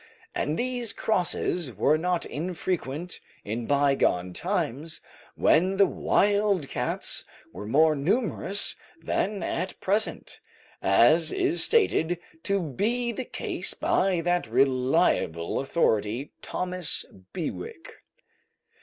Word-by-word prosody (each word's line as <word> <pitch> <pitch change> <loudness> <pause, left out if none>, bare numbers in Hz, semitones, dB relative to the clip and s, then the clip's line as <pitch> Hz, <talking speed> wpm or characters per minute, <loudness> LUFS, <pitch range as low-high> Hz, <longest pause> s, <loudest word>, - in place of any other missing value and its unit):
And 150 +3 -1
these 245 -2 -1
crosses 175 - 0
were 150 - +3
not 175 +2 0
infrequent 170 -1 -3 0.3
in 115 +3 -4
bygone 135 -11 +2
times 150 - -2 0.4
when 185 +5 +3
the 200 - +6
wild 200 -4 +1
cats - - -3 0.3
were 105 - -7
more 155 +6 +4
numerous 200 - +2 0.2
than 190 +4 -1
at 180 +3 -3
present, 205 +3 -1 0.4
as 155 - +4
is 370 -2 +1
stated 175 - +2 0.2
to 200 +2 0
be 220 - -1
the 250 +3 -5
case - - -2
by 185 -3 +1
that 175 +1 0
reliable 125 -9 +1
authority, 125 -4 0
Thomas 180 -2 -2 0.3
Bewick. 335 - -6
170 Hz, 100 wpm, -26 LUFS, 140-200 Hz, 0.4 s, the